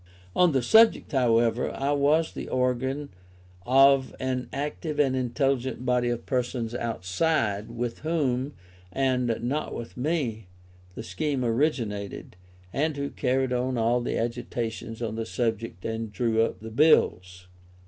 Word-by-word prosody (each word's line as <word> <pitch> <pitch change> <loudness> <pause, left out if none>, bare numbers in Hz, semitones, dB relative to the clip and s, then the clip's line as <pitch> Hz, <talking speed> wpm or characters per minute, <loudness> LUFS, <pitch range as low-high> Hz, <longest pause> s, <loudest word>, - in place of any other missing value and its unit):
On 180 -2 +5
this 130 -4 0
subject, 225 - +5
however, 120 -3 +2
I 140 +1 -2
was 145 +3 +2
the - - -6
organ 130 +3 -1 0.6
of 135 +1 +5
an 130 -1 -2
active 150 +2 -4
and 135 -3 +3
intelligent 130 0 -1
body 125 -1 +2
of 120 -1 -3
persons 125 -3 -2
outside, 110 - -1
with 120 0 -4
whom, 140 -4 -1 0.4
and 125 -1 +1
not 140 +6 -2
with 115 - -7
me, 125 - -2 0.5
the 110 - -6
scheme 140 0 -2
originated, 115 - -1 0.4
and 150 +1 0
who 140 0 -3
carried 130 -1 0
on 125 0 -1
all 120 +2 +2
the 120 - -2
agitation 115 -1 -3
on 110 - -4
the 115 0 -3
subject 115 -7 -3
and 110 -1 -3
drew 110 +2 +1
up 115 - -1
the 110 0 -8
Bills. 90 - +3
125 Hz, 140 wpm, -26 LUFS, 115-140 Hz, 0.6 s, On